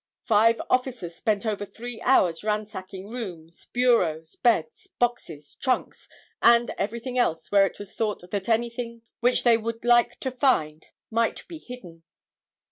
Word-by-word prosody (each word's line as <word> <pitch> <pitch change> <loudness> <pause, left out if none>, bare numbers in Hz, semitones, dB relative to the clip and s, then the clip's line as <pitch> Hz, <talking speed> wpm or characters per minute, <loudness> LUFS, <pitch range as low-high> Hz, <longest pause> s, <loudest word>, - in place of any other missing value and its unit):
Five 225 +1 +4
officers 250 -9 -1
spent 210 +3 -1
over 210 -2 -1
three 235 +3 -8
hours 180 -10 +3
ransacking 205 -2 -4
rooms, 175 -9 -8
bureaus, 180 -11 +1
beds, 165 -10 0
boxes, 175 -12 -2
trunks 260 -2 -2 0.3
and 235 0 +5
everything 235 +5 -3
else 165 -9 0
where 200 -1 +5
it - - -10
was 205 0 -9
thought 210 -5 -3
that 200 +1 -3
anything 235 0 -1 0.2
which 245 +1 +2
they 235 -2 +5
would 230 +1 -5
like 240 0 +4
to 260 - -2
find 160 - +1 0.2
might 230 +1 0
be 330 -3 -9
hidden. 190 - -11
225 Hz, 140 wpm, -25 LUFS, 185-240 Hz, 0.3 s, and